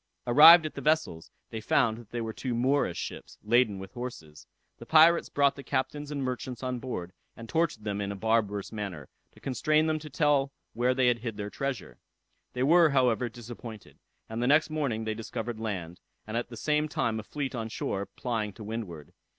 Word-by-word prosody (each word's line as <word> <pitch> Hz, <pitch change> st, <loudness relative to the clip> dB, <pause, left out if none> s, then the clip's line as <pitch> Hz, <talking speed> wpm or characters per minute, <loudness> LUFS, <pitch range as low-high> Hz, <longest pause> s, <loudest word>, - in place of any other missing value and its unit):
Arrived 155 Hz, +7 st, +9 dB
at 155 Hz, -, -4 dB
the -, -, -7 dB
vessels, 155 Hz, -, 0 dB, 0.2 s
they 110 Hz, -, -5 dB
found 110 Hz, +1 st, +2 dB
that 115 Hz, -3 st, -14 dB
they 120 Hz, -, -4 dB
were 110 Hz, -1 st, -4 dB
two 125 Hz, 0 st, -3 dB
Moorish 130 Hz, +4 st, +1 dB
ships, -, -, -7 dB
laden 110 Hz, -1 st, +3 dB
with 95 Hz, 0 st, -9 dB
horses. 115 Hz, -, -8 dB, 0.3 s
The -, -, -10 dB
pirates 165 Hz, +2 st, +6 dB
brought 140 Hz, -1 st, +2 dB
the 140 Hz, -, -8 dB
captains 145 Hz, +3 st, -2 dB
and 145 Hz, -2 st, -3 dB
merchants 125 Hz, 0 st, -4 dB
on 125 Hz, -1 st, -2 dB
board, 90 Hz, -9 st, -5 dB, 0.2 s
and 115 Hz, -, -9 dB
tortured 160 Hz, -7 st, 0 dB
them 105 Hz, -1 st, -2 dB
in 100 Hz, 0 st, -2 dB
a -, -, -5 dB
barbarous 105 Hz, -1 st, 0 dB
manner, 95 Hz, -10 st, -6 dB, 0.2 s
to -, -, -18 dB
constrain 155 Hz, +4 st, +1 dB
them 155 Hz, -1 st, 0 dB
to 150 Hz, 0 st, -9 dB
tell 140 Hz, -1 st, +2 dB, 0.2 s
where 125 Hz, +2 st, +1 dB
they 130 Hz, -1 st, +2 dB
had 120 Hz, -1 st, +2 dB
hid 115 Hz, -2 st, -5 dB
their 105 Hz, 0 st, -5 dB
treasure. 135 Hz, -7 st, -4 dB, 0.5 s
They 125 Hz, -, -1 dB
were, 165 Hz, +3 st, +6 dB
however, 125 Hz, -3 st, +2 dB
disappointed; 115 Hz, -1 st, -10 dB, 0.3 s
and 110 Hz, +1 st, -4 dB
the 125 Hz, -, +1 dB
next 155 Hz, +3 st, +4 dB
morning 135 Hz, -8 st, -1 dB
they 110 Hz, 0 st, -2 dB
discovered 115 Hz, +1 st, -5 dB
land, 90 Hz, -6 st, -4 dB, 0.3 s
and 110 Hz, -, -6 dB
at 120 Hz, 0 st, -2 dB
the 120 Hz, -, -9 dB
same 150 Hz, +3 st, 0 dB
time 115 Hz, -5 st, -1 dB
a -, -, -6 dB
fleet 140 Hz, +4 st, -4 dB
on 115 Hz, -3 st, -4 dB
shore 100 Hz, -3 st, -3 dB
plying 110 Hz, -1 st, -3 dB
to 110 Hz, -, -10 dB
windward. 105 Hz, -8 st, -6 dB
120 Hz, 200 wpm, -28 LUFS, 110-140 Hz, 0.5 s, Arrived